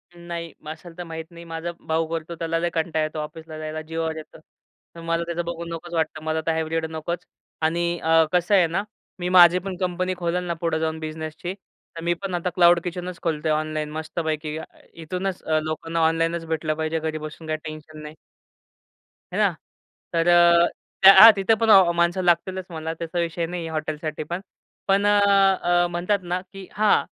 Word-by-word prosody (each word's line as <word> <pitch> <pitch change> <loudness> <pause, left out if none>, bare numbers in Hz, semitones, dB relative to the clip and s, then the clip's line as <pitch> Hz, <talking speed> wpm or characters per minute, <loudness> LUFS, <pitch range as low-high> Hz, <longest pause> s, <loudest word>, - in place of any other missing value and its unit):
नाही 170 -1 -6 0.2
असेल 165 +2 -11
तर 175 - -5
माहीत 160 -1 -7
नाही, 170 0 -11
माझा 165 +1 -5 0.2
भाऊ 160 +1 +1
करतो 165 +1 -4
त्याला 165 0 -2
लई 175 +1 0
कंटाळा 160 -1 0
येतो 155 0 -4
ऑफिसला 155 +1 -7
जायला, 155 0 -5
जीवावर 160 0 -3
येतं 155 - -11 0.6
तर 170 - -9
मला 165 0 -1
त्याचं 170 0 -3
बघून 170 0 -5
नकोच 175 +1 -8
वाटतं 155 -1 -1
मला 160 0 -1
तर 165 - +2
हायब्रिड 160 0 -1
नकोच. 160 +2 -4 0.4
आणि 170 +2 0
अ, 160 0 +4
कसं 180 +3 +3
आहे 180 -3 +5
ना, 175 +5 -1 0.4
मी 175 0 -2
माझी 180 -1 +7
पण 190 +1 -5
कंपनी 185 0 -1
खोलन 180 0 -1
ना 175 -1 -2
पुढे 165 -1 0
जाऊन 160 0 -2
बिझनेसची, 160 +2 -5
तर 190 -3 -15
मी 170 0 +2
पण 195 -2 -4
आता 175 +1 -1
क्लाऊड 175 -1 +6
किचनच 180 0 -5
खोलतो 160 -1 -1
ऑनलाईन 155 -1 -3
मस्त 155 +2 -5
पैकी. 155 -1 -2 0.4
इथूनच 180 +3 -4 0.2
लोकांना 165 +1 -3
ऑनलाईनच 165 +1 0
भेटलं 160 -1 -1
पाहिजे 160 +1 -2
घरी 155 0 -3
बसून, 155 +1 -8
काही 155 - -1
टेन्शन 155 0 -9
नाही. 150 0 -9 1.2
है - - -2
ना. - - +3 0.6
तर 165 0 +1
अ, 175 0 +6 0.4
त्या 195 +1 +11
हा 225 - +12
तिथे 195 +3 +2
पण 225 - +2 0.3
माणसं 170 +2 +2
लागतीलच 180 +2 +1
म्हणा, 160 -1 -4
त्याचा 170 +1 -4
विषय 170 0 -1
नाही 175 +1 -5
आहे 165 - -5
हॉटेलसाठी 155 0 -3
पण. 175 +4 -5 0.5
पण 195 +1 +3
अ, 195 -4 +4
म्हणतात 180 +4 0
ना 175 +1 -2
की 195 -1 -9
हां 215 0 +3
165 Hz, 185 wpm, -24 LUFS, 160-175 Hz, 1.2 s, हा